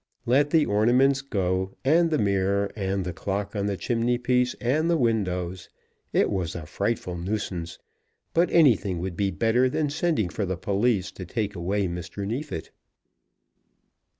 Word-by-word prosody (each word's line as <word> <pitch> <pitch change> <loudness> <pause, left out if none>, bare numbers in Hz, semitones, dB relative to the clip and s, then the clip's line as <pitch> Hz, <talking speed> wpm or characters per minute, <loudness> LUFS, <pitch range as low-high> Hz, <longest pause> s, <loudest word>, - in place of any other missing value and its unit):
Let 140 +4 +3
the 155 0 +4
ornaments 125 +6 +3
go, 95 -7 -1
and 165 +4 +4
the 155 - +1
mirror, 100 -2 +1
and 95 -2 -2
the 90 - -3
clock 100 +4 -3
on 100 0 -1
the 100 -1 -2
chimney 120 +5 0
piece, 125 0 +1
and 150 +7 0
the 170 - +3
windows. 95 - -1 0.4
It - - +2
was 90 -4 -2
a 85 -3 -6
frightful 100 +1 -2
nuisance, 90 -2 -4 0.6
but 170 +2 +3
anything 110 - +4
would 90 +1 -4
be 100 +1 +1
better 115 +6 +2
than 145 +2 -1
sending 155 - 0
for 105 - -3
the 95 -2 -2
police 100 0 0
to 95 - -8
take 105 +1 -2
away 95 +3 -1
Mr. 90 +3 -5
Neefit. 110 - -4
100 Hz, 155 wpm, -26 LUFS, 95-125 Hz, 0.6 s, the